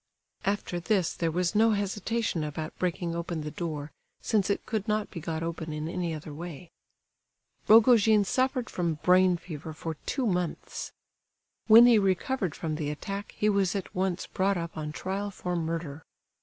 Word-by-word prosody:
After 195 Hz, -3 st, -1 dB
this 185 Hz, -1 st, +1 dB
there 165 Hz, -, -1 dB
was 175 Hz, +3 st, 0 dB
no 220 Hz, +1 st, +4 dB
hesitation 205 Hz, -2 st, -1 dB
about 155 Hz, +1 st, -5 dB
breaking 175 Hz, -1 st, -1 dB
open 170 Hz, -1 st, -3 dB
the 150 Hz, 0 st, -5 dB
door, 155 Hz, -3 st, -4 dB, 0.3 s
since 210 Hz, -4 st, +1 dB
it 200 Hz, -, -1 dB
could 220 Hz, -2 st, -2 dB
not 215 Hz, -1 st, 0 dB
be 170 Hz, -, -6 dB
got 160 Hz, 0 st, -3 dB
open 165 Hz, -1 st, -4 dB
in 150 Hz, +1 st, -4 dB
any 175 Hz, 0 st, -2 dB
other 155 Hz, -1 st, -6 dB
way. 165 Hz, +1 st, -8 dB, 1.0 s
Rogojin 220 Hz, -2 st, +6 dB
suffered 255 Hz, +2 st, 0 dB
from 170 Hz, -3 st, -1 dB
brain 180 Hz, 0 st, +5 dB
fever 160 Hz, -2 st, -8 dB
for 160 Hz, +1 st, -5 dB
two 265 Hz, -, 0 dB
months. 180 Hz, -5 st, -2 dB, 0.8 s
When 225 Hz, +2 st, +10 dB
he 235 Hz, -3 st, +6 dB
recovered 195 Hz, -, 0 dB
from 155 Hz, -2 st, -3 dB
the 150 Hz, -2 st, -2 dB
attack 195 Hz, +7 st, -5 dB
he 210 Hz, -, +1 dB
was 200 Hz, -2 st, +2 dB
at 195 Hz, -, -4 dB
once 185 Hz, -1 st, -1 dB
brought 195 Hz, +1 st, 0 dB
up 170 Hz, -1 st, -5 dB
on 150 Hz, -1 st, -4 dB
trial 195 Hz, +6 st, -3 dB
for 180 Hz, -2 st, -4 dB
murder. 160 Hz, -2 st, -3 dB
180 Hz, 170 wpm, -28 LUFS, 160-205 Hz, 1.0 s, When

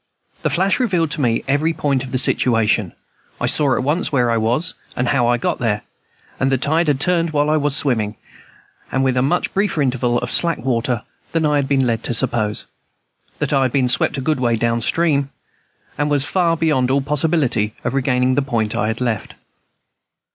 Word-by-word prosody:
The -, -, 0 dB
flash 190 Hz, +7 st, +1 dB
revealed 180 Hz, -, 0 dB
to 150 Hz, -, -2 dB
me 115 Hz, -3 st, +1 dB
every 145 Hz, +4 st, +1 dB
point 140 Hz, -4 st, -1 dB
of 130 Hz, -, -8 dB
the 130 Hz, -, 0 dB
situation. 115 Hz, -6 st, +2 dB, 0.5 s
I -, -, -1 dB
saw 140 Hz, -4 st, +2 dB
at -, -, -1 dB
once 150 Hz, +7 st, 0 dB
where 125 Hz, -4 st, +2 dB
I -, -, +1 dB
was, 120 Hz, +11 st, 0 dB, 0.2 s
and 120 Hz, 0 st, -1 dB
how 125 Hz, -4 st, +2 dB
I 120 Hz, 0 st, +2 dB
got -, -, -2 dB
there: 110 Hz, -4 st, -1 dB, 0.6 s
that 135 Hz, -, +1 dB
the 135 Hz, -, +2 dB
tide 160 Hz, +5 st, +1 dB
had 145 Hz, -3 st, +1 dB
turned 170 Hz, +1 st, +1 dB
while 150 Hz, -1 st, +1 dB
I 155 Hz, -, +3 dB
was 145 Hz, -1 st, 0 dB
swimming, 110 Hz, -8 st, 0 dB, 0.8 s
and 135 Hz, -, 0 dB
with 130 Hz, -1 st, +1 dB
a 125 Hz, -, +2 dB
much 155 Hz, +7 st, 0 dB
briefer 200 Hz, -4 st, 0 dB
interval 125 Hz, -3 st, +1 dB
of -, -, -3 dB
slack 170 Hz, -1 st, +3 dB
water 120 Hz, -1 st, 0 dB, 0.3 s
than 165 Hz, -1 st, +1 dB
I 150 Hz, -1 st, +2 dB
had 140 Hz, -1 st, 0 dB
been 135 Hz, -2 st, +2 dB
led 115 Hz, -2 st, 0 dB
to 120 Hz, -, 0 dB
suppose, 110 Hz, -2 st, 0 dB, 0.7 s
that -, -, -2 dB
I 135 Hz, -, +3 dB
had 130 Hz, -2 st, +1 dB
been 130 Hz, -1 st, +1 dB
swept 125 Hz, -, +1 dB
a -, -, -2 dB
good 150 Hz, +1 st, 0 dB
way 120 Hz, -2 st, +1 dB
down 115 Hz, +1 st, 0 dB
stream, 140 Hz, 0 st, +1 dB, 0.7 s
and 145 Hz, 0 st, +1 dB
was 145 Hz, -2 st, +2 dB
far 170 Hz, +1 st, +1 dB
beyond 150 Hz, -6 st, +1 dB
all 140 Hz, +1 st, +2 dB
possibility 140 Hz, -7 st, 0 dB
of 120 Hz, -, -2 dB
regaining 125 Hz, -1 st, +1 dB
the 145 Hz, -, +2 dB
point 115 Hz, -6 st, -1 dB
I 105 Hz, -, 0 dB
had 110 Hz, +2 st, -3 dB
left. 115 Hz, -5 st, -2 dB
135 Hz, 205 wpm, -19 LUFS, 120-150 Hz, 0.8 s, I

